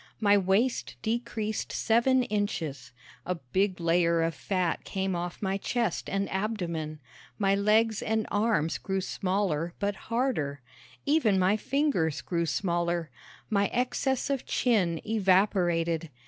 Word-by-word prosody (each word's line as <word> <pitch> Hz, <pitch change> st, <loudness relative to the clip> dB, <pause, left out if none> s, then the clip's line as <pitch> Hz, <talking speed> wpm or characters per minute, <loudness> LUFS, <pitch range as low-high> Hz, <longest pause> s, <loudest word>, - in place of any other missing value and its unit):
My 205 Hz, -2 st, +5 dB
waist 200 Hz, +6 st, +1 dB
decreased 225 Hz, -2 st, -2 dB
seven 250 Hz, +3 st, +3 dB
inches. 190 Hz, -, -3 dB, 0.3 s
A 180 Hz, -, -2 dB
big 185 Hz, +7 st, -1 dB
layer 170 Hz, 0 st, +2 dB
of 165 Hz, 0 st, 0 dB
fat 180 Hz, +2 st, -1 dB
came 190 Hz, -1 st, -2 dB
off 175 Hz, +3 st, -4 dB
my 190 Hz, 0 st, 0 dB
chest 230 Hz, -2 st, -1 dB
and 195 Hz, 0 st, -1 dB
abdomen. 175 Hz, -7 st, -3 dB, 0.4 s
My 195 Hz, -2 st, +2 dB
legs 215 Hz, +2 st, +3 dB
and 220 Hz, 0 st, 0 dB
arms 205 Hz, -7 st, +1 dB
grew 190 Hz, 0 st, -2 dB
smaller 185 Hz, -4 st, -1 dB
but 200 Hz, 0 st, 0 dB
harder. 220 Hz, -, -1 dB, 0.4 s
Even 280 Hz, -9 st, +3 dB
my 185 Hz, +2 st, +3 dB
fingers 255 Hz, -, 0 dB
grew 170 Hz, -2 st, -1 dB
smaller. 170 Hz, +1 st, -1 dB, 0.4 s
My 200 Hz, -1 st, +2 dB
excess 255 Hz, +2 st, 0 dB
of 275 Hz, -3 st, -1 dB
chin 185 Hz, -10 st, +1 dB
evaporated. 180 Hz, -5 st, +2 dB
195 Hz, 125 wpm, -28 LUFS, 170-220 Hz, 0.4 s, My